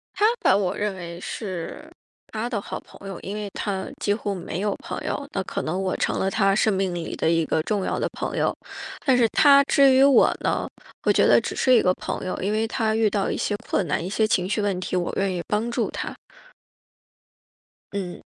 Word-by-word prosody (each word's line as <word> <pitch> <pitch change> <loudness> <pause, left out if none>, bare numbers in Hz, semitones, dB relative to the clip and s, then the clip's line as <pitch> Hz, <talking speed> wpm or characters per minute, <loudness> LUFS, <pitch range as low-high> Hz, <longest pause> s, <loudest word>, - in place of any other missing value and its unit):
他 - - -1 0.2
把 195 - +4
我 195 -2 0
认 210 -2 -1
为 170 -2 -7
是 185 -3 -6 0.4
他 225 +2 -3
的 225 - -1
好 - - -6
朋 195 - -14
友， 190 - -6
因 200 +2 -6
为 210 -1 -4
他 195 -2 -3 0.2
几 205 - +2
乎 205 -1 -3
没 180 -1 -5
有 205 -1 0
朋 - - -6
友。 285 - -3
那 195 - -1
可 - - -4
能 180 +5 -2
我 185 -1 -1
成 - - 0
了 190 - +1
他 195 -2 +3
生 215 0 +3
命 190 -2 -1
里 170 -2 -4
的 - - +1
一 165 -1 +2
个 160 - +1
重 205 -1 -1
要 - - -1
的 - - 0
朋 - - -4
友。 - - +1 0.5
但 260 -3 +4
是 235 - +4
他 280 +2 +6
至 275 -1 +5
于 260 - +5
我 275 -1 +6
呢， - - -1 0.4
我 - - +4
觉 - - +4
得 - - +6
只 - - -4
是 255 - +3
一 240 - +6
个 185 - +3
朋 - - -5
友。 185 - -2
因 195 +3 0
为 220 +1 +1
他 220 -2 0
遇 220 -1 +3
到 200 -1 0
一 - - -1
些 205 - -1
困 190 - +1
难， 150 - -1
一 180 - -4
些 215 +2 +2
情 185 -4 +1
绪 215 - 0
问 200 -2 0
题， 185 - -3
我 180 -1 0
愿 195 -1 +1
意 175 - -2
帮 215 +3 0
助 235 - -1
他。 - - -5 1.8
嗯。 190 -3 -5
200 Hz, 250 characters per minute, -24 LUFS, 185-220 Hz, 1.8 s, 他